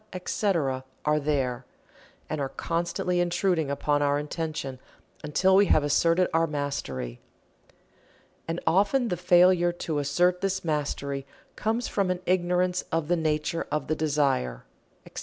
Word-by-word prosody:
etc., 175 - -1 0.2
are 150 0 +3
there, 135 -4 -1 0.6
and 155 -2 -3
are 135 - -2
constantly 170 +4 -2
intruding 175 -3 +1
upon 145 +1 0
our 145 0 +2
attention 150 -3 -4 0.4
until 185 +6 +3
we 200 +1 +5
have 155 - +4
asserted 165 +5 +3
our 165 0 +3
mastery. 70 - -4 1.3
And 165 +1 -2
often 205 +9 +2
the 180 - 0
failure 175 0 +4
to 160 -3 -3
assert 175 +6 +1
this 190 -1 -1
mastery 140 -3 -2 0.3
comes 225 +3 -1
from 195 -2 0
an 180 -1 -1
ignorance 180 0 +1
of 165 -1 -1
the 175 - +4
nature 155 0 -1
of 150 -3 -1
the 155 - -1
desire, 140 - 0 0.4
etc. - - -8
160 Hz, 140 wpm, -27 LUFS, 145-180 Hz, 1.3 s, we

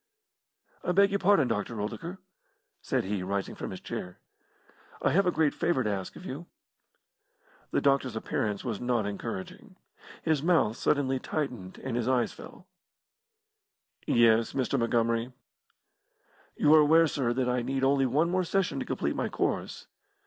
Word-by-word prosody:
"I 180 - 0
beg 200 +1 +5
your 200 - +1
pardon, 190 -8 +4
Dr. 115 0 -2
Oldacre," 165 - -5 0.6
said - - -1
he, 100 0 -2
rising 100 +1 -2
from - - -6
his - - -7
chair; 90 0 -6 0.8
"I - - +1
have 195 +2 +3
a - - +4
great 160 -4 +2
favour 165 -6 0
to 105 - 0
ask 95 -2 -4
of 180 - -11
you." 165 +2 -6 1.2
The - - 0
doctor's 135 -4 +2
appearance 105 -2 -2
was 115 -5 -3
not 120 -3 0
encouraging. 180 - -6 0.5
His 160 -3 +1
mouth 160 -9 +2
suddenly 135 0 +1
tightened, 125 -12 -4
and 130 -3 -3
his 120 -1 -1
eyes 125 -2 +1
fell. - - -12 1.4
"Yes, 115 -1 +4
Mr. 135 +1 0
Montgomery?" 115 +1 0 1.2
"You 150 - +4
are 155 - +8
aware, 160 +2 +6
sir, 135 -6 0
that 130 0 0
I 125 0 +1
need 135 +2 -2
only 135 0 +3
one 155 +7 +1
more 185 0 +1
session 190 +2 0
to - - -3
complete - - -1
my - - -1
course." - - -2
130 Hz, 155 wpm, -29 LUFS, 115-160 Hz, 1.4 s, are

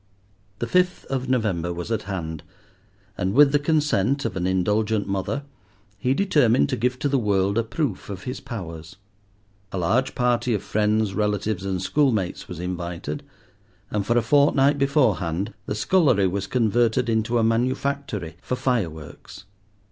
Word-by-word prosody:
The 120 - -2
fifth 180 +8 +1
of 130 -1 -2
November 100 -9 0
was 85 +5 -5
at 110 -2 0
hand, 80 -5 -4 0.8
and 95 +3 0
with 145 0 +7
the 145 - +3
consent 145 - +1
of 115 - -2
an 90 -1 -1
indulgent 105 +3 +1
mother, 100 +9 -2 0.6
he 125 +6 +1
determined 130 - +3
to - - 0
give 125 +3 0
to 145 - -1
the 140 -1 +2
world 100 -3 +1
a 115 - +2
proof 115 - -3
of 95 -1 -6
his 125 +1 -5
powers. 85 -8 -8 0.8
A - - -4
large 115 +10 +1
party 125 -1 +1
of 100 - -3
friends, 105 -1 +1
relatives, 105 -1 -1
and 95 -2 -1
school 130 +10 +2
mates 95 -6 -3
was 90 -3 -7
invited, 90 - -4 0.7
and 105 -1 0
for 120 +4 +1
a 120 - +3
fortnight 140 +2 +4
beforehand 105 - +1
the 105 - -2
scullery 125 - +3
was 95 +1 -1
converted 120 +1 +2
into 115 +1 +1
a 115 - +2
manufactory 120 - -1
for 125 - -2
fireworks. 95 - -3
110 Hz, 155 wpm, -24 LUFS, 95-130 Hz, 0.8 s, with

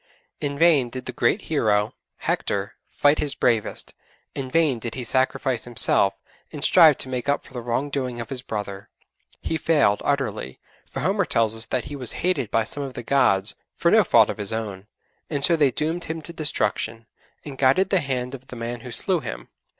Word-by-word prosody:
In 140 -1 -3
vain 150 -6 +4
did 130 +1 -7
the - - -4
great 120 - +1
hero, 105 -8 +1 0.2
Hector, - - -2 0.2
fight 145 +1 +3
his 145 -2 -1
bravest; 115 -3 0 0.4
in 130 -2 -4
vain 150 -4 +2
did 115 0 -6
he 130 - -4
sacrifice 130 0 0
himself, 105 -4 +3 0.4
and 150 -3 -6
strive 160 -6 +6
to - - -2
make 130 +1 -3
up 145 - 0
for - - -16
the 125 - -5
wrong 120 +5 -2
doing 130 -4 -3
of 115 - -6
his 130 -2 -3
brother; 100 -4 -6 0.5
he 160 - -2
failed 145 -12 +2
utterly, 110 - -2 0.3
for - - -5
Homer - - +1
tells 115 -1 +1
us 110 0 -2
that 125 +2 -2
he 145 +1 -6
was 125 -4 -2
hated 160 - +1
by 115 - +2
some 145 +6 -6
of 135 -2 -6
the 120 - -6
'gods' 105 -7 +3 0.2
for - - +2
no - - +6
fault - - +5
of - - -9
his 100 0 -3
own, 105 -3 -4 0.4
and 145 -3 -1
so 170 - +6
they 150 -4 +4
doomed 160 +6 -2
him 160 +1 -4
to 170 - -8
destruction, 115 -7 -2 0.4
and 140 -3 -8
guided 140 +9 +3
the 190 - +4
hand 130 -2 -3
of 130 -1 -9
the 125 - -9
man 120 +1 -5
who 125 - -9
slew 175 - 0
him. - - -7
130 Hz, 205 wpm, -24 LUFS, 115-145 Hz, 0.5 s, strive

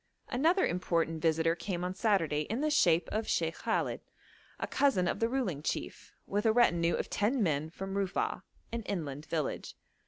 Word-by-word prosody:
Another 330 +9 +3
important 165 -3 0
visitor 165 0 +2
came 175 0 -4
on 180 +1 -2
Saturday 175 -8 +1
in 230 +5 -1
the 305 0 +1
shape 170 - +4
of 220 +1 -1
Sheikh 165 -1 +1
Khallet, - - -1 0.6
a - - -1
cousin 230 -11 +2
of - - -1
the 230 - +2
ruling 235 - -1
chief, - - -4
with 205 +2 0
a - - +6
retinue 175 -8 +3
of - - -2
ten 225 +3 +1
men, 155 -3 0
from 195 +3 -6
Rufa'a, 195 -2 -1 0.3
an 235 0 -2
inland 155 -5 -4
village. 155 -2 -3
180 Hz, 175 wpm, -31 LUFS, 165-225 Hz, 0.6 s, a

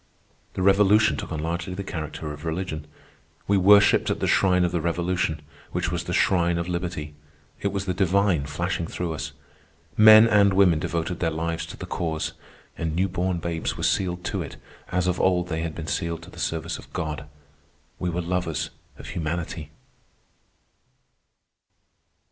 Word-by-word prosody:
The 95 - -1
Revolution 100 -2 +5
took - - -6
on 80 - -3
largely 85 +3 -3
the 100 - -4
character 75 -4 -5
of 75 - -10
religion. 80 -2 -3 0.6
We 100 - +3
worshipped 100 +2 +6
at - - -1
the - - 0
shrine 90 -2 +3
of 85 - -1
the 85 -2 -1
Revolution, 85 -2 -1 0.3
which - - -1
was - - -2
the - - -4
shrine 85 -2 +2
of 85 0 -2
liberty. 85 -4 -4 0.5
It - - 0
was 100 0 -2
the 90 - -1
divine 95 -4 +2
flashing 85 +3 -2
through 85 -1 -3
us. 75 - -5 0.6
Men 110 +1 +9
and 100 -3 +4
women 90 -5 +5
devoted 85 +2 -2
their 85 - +1
lives 80 +1 -3
to - - -9
the - - -6
Cause, 80 -2 -2 0.4
and 80 -1 -3
new 95 +3 +2
born 90 0 -1
babes 85 -1 -3
were - - -5
sealed 90 -2 0
to - - -2
it - - -7 0.3
as 90 0 +1
of 90 0 0
old 90 -1 +2
they 80 -1 -2
had 80 -1 -4
been 80 - -5
sealed 85 -1 -2
to - - -12
the - - -12
service 80 -2 -2
of - - -14
God. 75 -3 -4 0.7
We 90 - -1
were 85 +1 -2
lovers 90 -2 -2 0.3
of - - -9
Humanity. 80 -1 -4
85 Hz, 170 wpm, -25 LUFS, 80-95 Hz, 0.7 s, Men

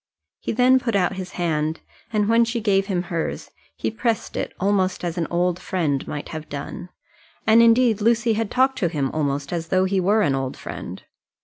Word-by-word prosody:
He - - -3
then 255 +3 +4
put 230 -4 -2
out 185 -1 +1
his 185 -1 -6
hand, 160 -2 -1 0.3
and 210 -2 +1
when 230 +1 +5
she 230 +1 -1
gave 195 -3 +2
him 180 -4 -1
hers 170 -2 -4 0.2
he - - -2
pressed 225 0 -2
it - - -2
almost 190 -1 +1
as 170 -2 -2
an 170 -3 -1
old 175 +1 0
friend 155 -7 -1
might 150 - -5
have 155 -1 -7
done. 145 +5 -6 0.6
And, 225 +2 +6
indeed, 230 -2 +4
Lucy 230 +1 +3
had 220 -1 -1
talked 260 +1 +2
to 175 - +1
him 140 -5 -1
almost 145 -1 -2
as 165 -1 -3
though 185 +2 +2
he 190 0 +1
were 205 +4 +3
an 140 - +2
old 135 -1 -3
friend. - - -7
190 Hz, 200 wpm, -23 LUFS, 165-225 Hz, 0.6 s, And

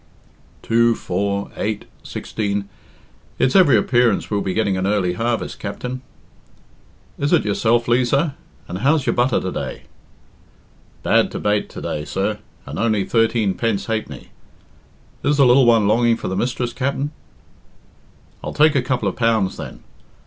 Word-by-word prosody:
"Two 115 0 +3
four 100 +2 -2
eight 105 -1 -3 0.2
sixteen 100 -2 -3 0.7
it's 130 0 +1
every 185 -7 +6
appearance 120 -3 +2
we'll 100 -1 +1
be 95 -2 -2
getting 100 -3 +1
a 95 - -2
early 95 -2 +1
harvest, 115 +4 -2
Capt'n." 125 +5 -5 1.2
"Is 145 +1 0
it 175 -9 +3
yourself, 115 +3 +1
Liza? 130 +5 +2 0.3
And 90 - -5
how's 140 +4 +2
your - - +2
butter 120 0 +2
to 95 - -4
day?" - - -5 1.2
"Bad - - +3
to - - -5
bate 105 0 0
to - - -9
day, 75 - -3
sir, 100 +6 -2 0.3
and 70 - -6
only 110 -3 +1
thirteen 115 -2 +1
pence 115 -2 -1
ha'penny. 110 -1 -4 0.9
Is 145 0 +2
the 140 - +6
lil 125 +1 +5
one 115 -3 +5
longing 115 +2 +3
for - - -4
the 95 - -2
mistress, 120 +2 -2
Capt'n?" 140 +2 -2 1.3
"I'll - - -4
take 155 0 +5
a 140 - +2
couple 125 -4 -1
of 95 - -2
pounds, 115 -5 +1
then. - - -9
115 Hz, 150 wpm, -20 LUFS, 100-125 Hz, 1.3 s, every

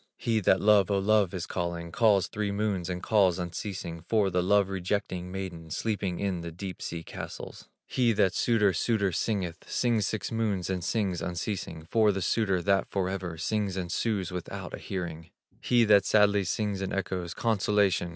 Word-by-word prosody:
He 115 -2 +1
that 95 -1 +3
"Love! 105 -3 +5
O 100 - +2
Love!" 100 -1 +3
is 90 -3 -4
calling, 85 -1 -3
Calls 105 -2 +4
three 105 -1 -2
moons 100 -3 -1
and 90 -1 -4
calls 95 -5 +3
unceasing, 85 -1 -5
For 100 +2 +1
the 90 0 +2
love 100 +2 +3
rejecting 95 -1 -3
maiden 90 -4 -6
Sleeping 100 0 -2
in 95 -4 -1
the 85 0 -6
deep 90 +1 -7
sea 85 0 -5
castles. - - -8 0.2
He 120 -2 +2
that 95 -3 +2
"Suitor! 105 -4 +3
Suitor!" 100 +2 +1
singeth, 90 -2 -2
Sings 115 -4 +1
six 105 -2 -3
moons 105 -5 -1
and 90 -2 -2
sings 95 -4 -1
unceasing 90 -3 -4
For 110 +3 +3
the 95 -2 -2
suitor 95 -5 +1
that 100 +1 +2
forever 95 -3 -2
Sings 100 +2 -1
and 90 -2 -3
sues 100 -5 -1
without 90 -1 -6
a - - -5
hearing. 85 -3 -5 0.3
He 120 -1 +3
that 100 -2 +5
sadly 105 -2 +4
sings 100 +1 -1
and 95 - -3
echoes, 90 -3 -3
"Consolation! 100 -5 +1
95 Hz, 175 wpm, -28 LUFS, 90-105 Hz, 0.3 s, Love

